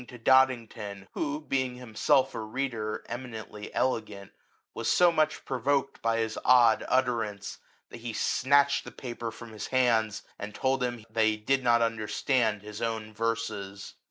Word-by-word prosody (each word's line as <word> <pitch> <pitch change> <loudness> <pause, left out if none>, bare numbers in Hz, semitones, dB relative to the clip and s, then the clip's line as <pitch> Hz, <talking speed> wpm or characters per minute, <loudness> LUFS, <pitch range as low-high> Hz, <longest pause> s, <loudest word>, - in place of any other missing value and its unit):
once 125 - -13
reading 125 - -9
to 115 - +2
Dodington, 115 -6 +2
who, 145 +1 -2
being 130 -4 -1
him 125 -3 -11
self 135 +3 +3
a - - -4
readereminently 110 -2 -5
elegant, 105 -6 -2 0.4
was - - -2
so 175 -1 +5
much 155 -2 0
provoked 135 +2 0
by 115 0 +1
his 110 -1 -1
odd 120 -3 +5
utterance, 115 -6 0 0.3
that - - -8
he 120 0 -5
snatched 140 +5 +3
the - - -8
paper 120 -2 -6
from 115 0 -11
his 110 -1 -6
hands, 115 -5 +2 0.2
and 105 0 -6
told 135 0 0
him 120 -3 -3
that 110 0 +2
he 110 0 +2
did 135 +5 0
not 120 -1 +4
understand 115 0 0
his 105 0 -8
own 110 -2 -3
verses. 105 -3 -3
115 Hz, 160 wpm, -28 LUFS, 110-130 Hz, 0.4 s, so